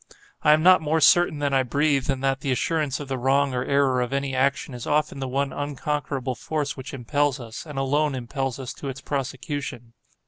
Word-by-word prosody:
I 150 - +6
am 155 +1 +2
not 185 0 +7
more 160 +1 +1
certain 175 -1 +5
that 140 - 0
I 135 - +4
breathe, 140 +2 +1
than 135 -2 -1
that 135 0 +1
the 135 - -2
assurance 150 +1 0
of 145 - -6
the 130 -1 -3
wrong 135 +2 +2
or 125 0 -1
error 135 -2 +2
of 125 +2 -2
any 140 -1 -1
action 135 +1 0
is 120 -2 -7
often 150 -1 0
the 135 - -3
one 135 +1 -1
unconquerable 145 -2 -2
force 145 +2 -3
which 135 +1 -8
impels 140 +2 0
us, 115 +5 -8
and 150 -2 -8
alone 145 +2 +1
impels 130 +1 -3
us 130 -3 -6
to 140 - -6
its 135 0 -6
prosecution. 130 -3 -4
135 Hz, 210 wpm, -24 LUFS, 130-145 Hz, -, not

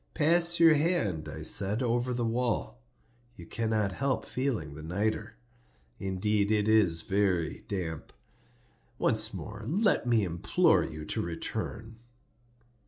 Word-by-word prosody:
"Pass 170 +2 +5
your 165 -1 +7
hand," 145 - 0
I - - -7
said, 105 +5 +1
"over 120 +1 0
the 120 -1 -1
wall; 115 - -2 0.5
you 85 - -11
cannot 110 0 -1
help 135 +7 -2
feeling 120 - -3
the 75 - -9
nitre. 100 +8 -3 0.6
Indeed 100 +2 -1
it 105 -1 +1
is 105 -7 +3
very 95 -4 -1
damp. 85 -6 -5 0.9
Once - - +2
more 105 - -8
let 195 - +1
me 115 -3 +3
implore 85 -2 +2
you 75 0 -7
to - - -3
return. 110 +6 -6
110 Hz, 125 wpm, -29 LUFS, 90-125 Hz, 0.9 s, your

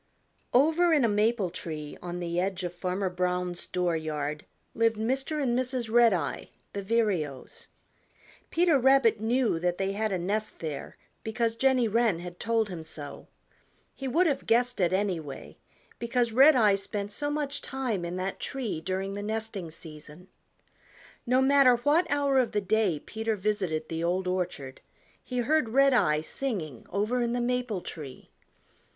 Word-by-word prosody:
Over 320 +6 +4
in 290 -6 +4
a - - +4
maple 210 -2 +1
tree 155 -4 -6
on 175 0 -5
the 170 0 -2
edge 190 0 -1
of 175 -1 -3
Farmer 185 +2 -2
Brown's 180 -1 -2
door 180 -2 0
yard 150 -1 -4 0.3
lived 225 -1 +2
Mr. 265 +7 -1
and 250 -4 +1
Mrs. 250 -2 -2
Redeye 225 -10 +3 0.3
the 200 - -3
Vireos. 190 - -1 0.8
Peter 335 -4 +3
Rabbit 260 -4 +4
knew 230 -5 +1
that 175 +1 0
they 195 0 -1
had 215 +1 -1
a 190 - 0
nest 205 +5 -2
there 155 -3 -6 0.3
because 225 0 -1
Jenny 255 -1 +3
Wren 225 -4 +2
had 175 +1 -9
told 225 -1 +1
him 180 -4 -6
so. 150 -2 -9 0.7
He 270 - -6
would 330 +8 +3
have 290 -5 -1
guessed 245 +1 +2
it 175 -2 +2
anyway, 185 -7 -3 0.4
because 235 0 0
Redeye 255 -5 +6
spent 200 +1 -4
so 290 +8 -2
much 290 -1 -2
time 250 -9 -3
in 170 +1 -4
that 185 +1 -3
tree 240 - -3
during 190 +3 -3
the 205 - -4
nesting 215 -4 -4
season. 155 +2 -12 1.0
No 255 +2 +4
matter 275 -2 +6
what 295 +8 +2
hour 280 -2 +2
of 235 -3 0
the 210 - +2
day 205 -3 +1
Peter 220 +4 -3
visited 185 -6 -1
the 165 0 -3
Old 180 +2 0
Orchard 180 -8 -3 0.4
he 250 - -5
heard 265 +1 +2
Redeye 250 - +4
singing 160 - -4
over 215 +6 0
in 235 0 0
the 245 - 0
maple 245 -5 -1
tree. 145 -7 -9
210 Hz, 155 wpm, -28 LUFS, 180-250 Hz, 1.0 s, Redeye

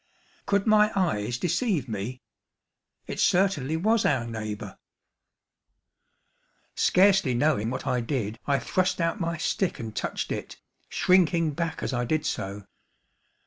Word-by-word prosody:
Could 200 -1 +2
my 215 -1 +5
eyes 120 - 0
deceive 180 - 0
me? 115 +4 -5 0.8
It - - -6
certainly 160 -6 +2
was 220 +6 +2
our 130 -5 +1
neighbor. 110 -2 -6 1.9
Scarcely 190 -8 +4
knowing 120 -5 +1
what 130 - -4
I 125 - +1
did, 115 -3 -3
I 140 -1 +3
thrust 185 +5 0
out 165 +6 0
my 170 -1 -2
stick 180 +3 -1
and 110 -2 -6
touched - - -3
it, - - -5 0.3
shrinking 170 -3 +3
back 160 +2 -3
as - - -2
I 120 0 0
did 155 +4 -1
so. 100 -6 -3
155 Hz, 130 wpm, -26 LUFS, 120-185 Hz, 1.9 s, my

